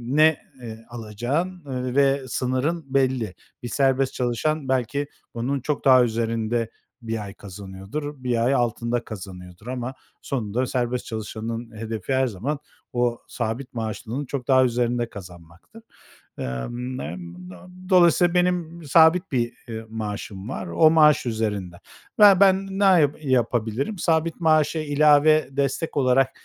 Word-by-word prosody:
ne, 155 0 +5 0.2
eee, 115 -1 -9
alacağın, 120 - -3
eee, 130 -1 -4
ve 140 0 +3
sınırın 130 +6 -1
belli. 130 -7 +1 0.3
Bir 120 - -4
serbest 135 0 +1
çalışan 130 +4 -1
belki 130 +3 0 0.3
onun 130 +4 -2
çok 150 +1 -3
daha 130 -2 +7
üzerinde 115 0 -1 0.3
1 115 -2 -4
ay 100 -1 -8
kazanıyordur, 100 +9 -8
1 120 -2 +1
ay 135 - +3
altında 120 -1 0
kazanıyordur 90 0 -10
ama 130 0 -4 0.3
sonunda 120 -1 -2
serbest 125 -1 -2
çalışanın 115 +1 -5
hedefi 110 +2 -4
her 130 0 +2
zaman 125 +8 -3 0.3
o 120 -1 0
sabit 120 +3 -4
maaşlının 115 +4 -4
çok 130 -2 -5
daha 130 -1 +5
üzerinde 120 -1 0
kazanmaktır. 90 - -13 0.5
Emm, 120 - -4
n 85 - -5 0.3
do 90 -2 -11 0.3
dolayısıyla 175 -1 +5
benim 175 -2 0
sabit 160 +5 +4
bir, 120 -2 0
eee, 110 -1 -6
maaşım 105 -1 -6
var 95 -8 -5
o 155 - +4
maaş 150 -3 +5
üzerinde. 105 -6 -2 0.4
Ya, 200 -3 +8
ben 195 0 +4
ne - - +2
ya 170 -7 +5
yapabilirim? 125 - 0
Sabit 165 0 +1
maaşa 155 0 +3
ilave 150 +1 +4
destek 140 +3 -2
olarak 130 0 +3
125 Hz, 135 wpm, -24 LUFS, 110-145 Hz, 0.5 s, Ya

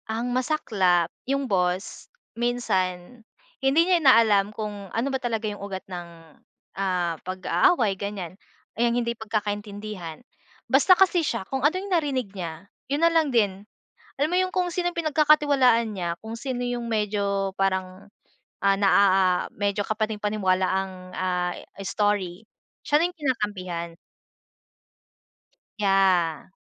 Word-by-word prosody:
Ang 235 +3 -2
masaklap, 210 - +1 0.2
yung 275 0 0
boss 185 -3 -1 0.2
minsan 230 -3 -2 0.4
hindi 270 +3 +3
niya 360 -2 +3
inaalam 220 -7 +5
kung 205 -3 -6
ano 230 +7 -1
ba 265 - 0
talaga 230 -3 -2
yung 205 -1 -4
ugat 195 -2 -6
ng, 175 -2 -7 0.7
ah, 180 -3 0
pag-aaway 195 - +2
ganyan, 195 -3 -5 0.4
yang 235 +1 +1
hindi 235 -1 0
pagkakaintindihan. 210 -3 -5 0.4
Basta 370 -1 +5
kasi 370 -2 +4
siya, 230 -10 -2
kung 265 +6 -3
ano 295 +6 +3
yung 390 0 -4
narinig 265 - 0
niya, 170 -2 -6 0.2
yun 290 +4 +2
na 335 - +4
lang 320 -3 +3
din. 205 -6 +1 0.5
Alam 295 +3 0
mo 355 - +1
yung 370 0 0
kung 360 -1 0
sinong 350 0 -1
pinagkakatiwalaan 290 -7 +3
niya, 175 -4 -3
kung 225 +1 -7
sino 250 -1 -3
yung 245 -1 -3
medyo 200 -3 -1
parang, 190 0 -1 0.5
ah, 195 0 +3
na 195 0 +2
a - - +6 0.4
a - - -22
medyo 205 0 -1
kapani-paniwala 210 -3 0
ang, 190 0 -1 0.2
ah, 180 -1 -1 0.3
story 205 -3 -1 0.4
siya 295 - +3
na 335 - +3
yung 355 - -11
kinakampihan. 205 - -2 1.9
Yeah. 190 -6 +2
210 Hz, 135 wpm, -25 LUFS, 190-260 Hz, 1.9 s, a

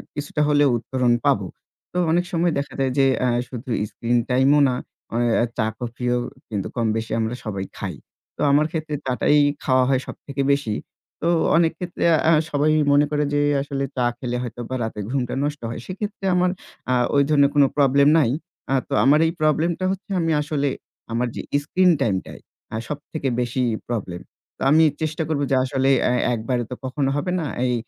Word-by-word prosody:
কিছুটা 145 +1 -3
হলেও 145 -1 +4
উত্তরণ 120 +1 0
পাবো। - - +2 0.4
তো - - -5
অনেক 175 +2 +2
সময় 170 0 +1
দেখা 140 - -5
যায় 135 -1 +1
যে, 135 - +5 0.2
অ্যা 125 - +2 0.2
শুধু 125 +1 -8 0.2
স্ক্রিন 120 +1 0
টাইমও 135 +3 +4
না, 125 - 0 0.4
ও - - +1 0.4
চা 110 - +1
কফিও 125 0 -2 0.3
কিন্তু 100 -4 -3
কম 115 -2 0
বেশি 115 0 -5
আমরা 110 +2 -1
সবাই 100 -3 -3
খাই। - - -4 0.4
তো - - -6
আমার 145 +2 +4
ক্ষেত্রে 155 -2 -3
চা-টাই 130 +3 +2 0.3
খাওয়া 130 -1 +3
হয় 130 -1 +2
সবথেকে 140 -1 -5
বেশি। 140 -7 0 0.5
তো 165 - 0 0.3
অনেক 165 -1 +3
ক্ষেত্রে, 180 -1 -4 0.2
অ্যা 165 - +5 0.2
সবাই 145 +1 +2 0.2
মনে 145 +1 +5
করে 150 0 +1
যে 145 - +2 0.2
আসলে 140 0 -3
চা 125 - +2
খেলে 125 -1 -3
হয়তোবা 120 +1 -5
রাতের 105 -2 -4
ঘুমটা 125 -3 -1
নষ্ট 145 0 -3
হয়। 115 - -5
সেক্ষেত্রে 200 +1 -5
আমার, 180 0 +3 0.4
অ্যা 125 - +2 0.2
ওই 140 - +5
ধরনের 140 -2 +5
কোন 145 - +6
problem 140 0 +4
নাই। 135 -7 +3 0.4
অ্যা 135 - +1
তো - - -3
আমার 145 +3 +5
এই 160 - +1
problem-টা 160 +4 +1
হচ্ছে 195 +2 -6
আমি 165 -1 +1
আসলে 145 -1 -1 0.4
আমার 120 +2 0
যে - - -3 0.2
স্ক্রিন 180 +4 +3
টাইমটাই, 100 -7 -1 0.3
হ্যাঁ, 110 +1 -4
সবথেকে 150 -1 -4
বেশি 125 +1 -1 0.3
problem। 95 -7 -4 0.4
তো - - -18
আমি 160 +2 +6 0.2
চেষ্টা 160 +1 -1
করব 150 -3 0
যে - - +4
আসলে, 135 +1 +1
আ - - +2
অ্যা - - +1
একবারে 120 +2 -1
তো 125 - -5
কখনো 135 +1 -1
হবে 165 +5 -1
না। 165 - -2 0.2
এই 125 - +1
140 Hz, 185 wpm, -22 LUFS, 125-150 Hz, 0.5 s, কোন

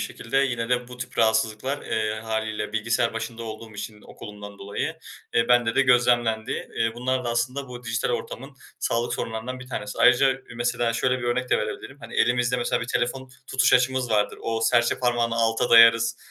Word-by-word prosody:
şekilde 115 +4 -2
yine 120 -4 0
de 125 0 0
bu 125 - -10
tip 125 0 -8
rahatsızlıklar, 110 +4 +1
eee, 110 0 -2
hâliyle 110 -1 -3
bilgisayar 115 +1 0
başında 115 +1 -5
olduğum 110 0 -8
için 105 +1 -8
okulumdan 105 -1 -11
dolayı, 100 +1 -4 0.4
eee, 115 0 +2
bende 120 -2 +3
de - - +4
gözlemlendi. 120 -2 +2 0.3
Eee, 115 0 +1
bunlar 130 +1 -1
da 120 - -2
aslında 125 +4 -2
bu 125 0 -9
dijital 115 +1 -1
ortamın 135 +3 -5 0.2
sağlık 115 +1 -1
sorunlarından 115 +3 -5
bir 130 - -11
tanesi. 105 -5 -5
Ayrıca 135 +2 +5
ü 130 -2 -12
mesela 120 -1 0
şöyle 130 +2 0
bir 120 - -6
örnek 125 +1 -1
de - - +4
verebilirim: 105 +6 -6
Hani, - - -10
elimizde 125 +1 +2
mesela 120 - 0
bir - - -5
telefon 130 +2 -2 0.2
tutuş 125 -2 +2
açımız 125 0 +2
vardır. 105 -1 +1
O 115 0 -2
serçe 120 +1 +2
parmağını 120 -2 +1
alta 115 +1 +1
dayarız, 115 0 +7
120 Hz, 185 wpm, -24 LUFS, 115-125 Hz, 0.4 s, dayarız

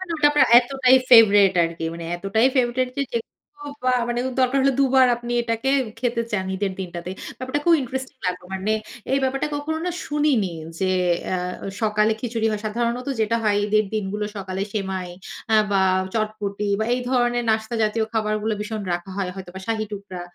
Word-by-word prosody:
মানে 375 -2 -6
ওটা 300 - +1
আপনার 290 -3 +4
এতটাই 260 0 +3
ফেভারাইট 205 -5 +7
আরকি। 165 0 -4
মানে 170 0 -7
এতটাই 200 +7 +2
ফেভরাইট 250 0 +1
যে 280 - +1
যেকোনো 290 +5 -7 0.2
বা 255 0 +3 0.2
মানে 240 - -1 0.2
দরকার 260 +1 +2
হলে 275 0 +3
দুবার 260 -1 +5
আপনি 240 0 -7
এটাকে 230 +2 -1 0.3
খেতে 235 -1 0
চান 190 -2 -1
ঈদের 195 0 -1
দিনটাতে। 175 -1 -5 0.3
ব্যাপারটা 260 +3 -2
খুব 340 - +6
ইন্টারেস্টিং 260 +2 -5
লাগলো। 180 0 -2
মানে 195 +3 -1 0.4
এই 275 - +4
ব্যাপারটা 270 +3 0
কখনো 300 +2 -3
না 360 - 0
শুনিনি। 290 - +1 0.3
যে 190 -1 +1 0.4
আ 185 - +1 0.4
সকালে 215 0 +2
খিচুড়ি 230 -2 -2
হয় 210 - -3
সাধারণত 235 +4 -2
যেটা 220 +1 +1
হয় 205 -1 +2
ঈদের 215 +1 +2
দিনগুলো 210 0 -2
সকালে 190 0 -4
সেমাই 190 -3 -3 0.4
আ - - +7 0.2
বা 195 -1 +3 0.3
চটপটি 210 -2 -2
বা 220 - 0
এই 250 - 0
ধরনের 240 -1 +1
নাস্তা 220 +2 -1
জাতীয় 220 +1 0
খাবারগুলো 215 0 0
ভীষণ 215 0 -4
রাখা 175 +2 -5
হয় 190 -2 -1
হয়তোবা 190 -1 -8
শাহী 220 -1 -1
টুকরা 195 -3 -7
220 Hz, 175 wpm, -23 LUFS, 200-255 Hz, 0.4 s, ফেভারাইট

